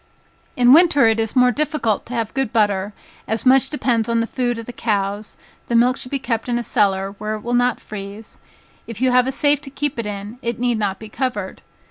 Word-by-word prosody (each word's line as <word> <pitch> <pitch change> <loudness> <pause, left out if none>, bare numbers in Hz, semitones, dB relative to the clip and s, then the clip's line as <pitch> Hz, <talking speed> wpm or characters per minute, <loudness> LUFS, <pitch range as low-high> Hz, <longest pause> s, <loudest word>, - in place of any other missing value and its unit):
In 245 0 +6
winter 305 -5 +6
it 225 0 +3
is 225 +2 -2
more 250 -1 +5
difficult 290 -6 -1
to 245 - -6
have 225 -2 -2
good 270 -4 -1
butter, 205 -3 +1 0.4
as 220 +3 -2
much 265 +1 +5
depends 240 -6 0
on 230 0 +1
the 230 - +1
food 245 0 -2
of 230 - -7
the 245 - -8
cows, 205 -2 -2 0.3
the 235 - -1
milk 245 +2 +4
should 250 - -6
be 275 - -1
kept 240 -3 -3
in 240 - +1
a 240 - -2
cellar, 195 -3 +1
where 215 +1 -3
it 215 - -8
will 240 +2 -3
not 245 0 +2
freeze, 205 +1 -9 0.5
if 230 -3 -7
you 260 0 +2
have 250 0 +4
a - - 0
safe 290 +1 +2
to 290 - -10
keep 275 0 -3
it 225 - -3
in, 205 +3 -7
it 235 -2 -3
need 240 -2 0
not 200 -2 -1
be 220 - -10
covered. 210 -4 -4
235 Hz, 230 wpm, -20 LUFS, 215-255 Hz, 0.5 s, In